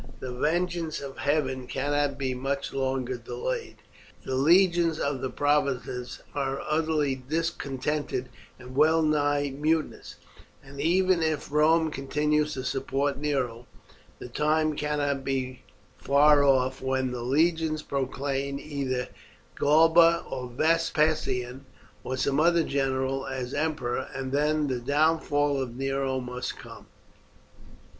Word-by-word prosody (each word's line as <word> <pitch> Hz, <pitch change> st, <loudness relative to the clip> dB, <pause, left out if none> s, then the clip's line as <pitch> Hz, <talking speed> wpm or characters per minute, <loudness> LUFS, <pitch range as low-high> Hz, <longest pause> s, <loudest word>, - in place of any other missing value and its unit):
The 130 Hz, -1 st, -5 dB
vengeance 165 Hz, +4 st, -1 dB
of 140 Hz, -1 st, -8 dB
heaven 130 Hz, -4 st, 0 dB
cannot 145 Hz, 0 st, -1 dB
be 135 Hz, -2 st, -1 dB
much 135 Hz, +2 st, -3 dB
longer 130 Hz, -2 st, -1 dB
delayed. 470 Hz, -, -4 dB, 0.5 s
The 130 Hz, -, -4 dB
legions 170 Hz, +3 st, +4 dB
in 140 Hz, -2 st, -1 dB
the 130 Hz, -, -2 dB
provinces 130 Hz, -3 st, -1 dB
are 135 Hz, -1 st, -2 dB
utterly 155 Hz, -2 st, +1 dB
discontented 140 Hz, -1 st, -3 dB, 0.3 s
and 125 Hz, 0 st, -11 dB
well 160 Hz, +3 st, +4 dB
nigh 145 Hz, -2 st, +1 dB
mutinous, 155 Hz, +3 st, -1 dB, 0.5 s
and 140 Hz, +1 st, -8 dB
even 185 Hz, +2 st, +3 dB
if 155 Hz, -3 st, -1 dB
Rome 160 Hz, +2 st, +3 dB
continues 150 Hz, +2 st, 0 dB
to 130 Hz, -, -4 dB
support 135 Hz, +1 st, -1 dB
Nero 125 Hz, -5 st, -2 dB, 0.5 s
the -, -, -8 dB
time 155 Hz, +4 st, +1 dB
cannot 145 Hz, -2 st, -1 dB
be 130 Hz, -2 st, -3 dB, 0.4 s
far 145 Hz, +1 st, +5 dB
off 130 Hz, -1 st, +2 dB
when 130 Hz, -1 st, -1 dB
the 125 Hz, -1 st, -4 dB
legions 155 Hz, +4 st, +1 dB
proclaim 140 Hz, 0 st, -2 dB
either 135 Hz, -4 st, -3 dB, 0.5 s
Galba, 165 Hz, +3 st, +5 dB
or 125 Hz, -1 st, -5 dB
Vespasian, 145 Hz, -3 st, 0 dB, 0.4 s
or 130 Hz, -, -3 dB
some 140 Hz, +2 st, +1 dB
other 170 Hz, +1 st, +4 dB
general, 135 Hz, -1 st, -1 dB
as 130 Hz, -1 st, -4 dB
emperor, 150 Hz, -5 st, -1 dB
and 135 Hz, -1 st, -4 dB
then 150 Hz, +2 st, +1 dB
the 130 Hz, -3 st, -2 dB
downfall 145 Hz, 0 st, +1 dB
of 120 Hz, -3 st, -5 dB
Nero 135 Hz, 0 st, -1 dB
must 125 Hz, 0 st, -5 dB
come. -, -, -12 dB
140 Hz, 120 wpm, -27 LUFS, 130-155 Hz, 0.5 s, far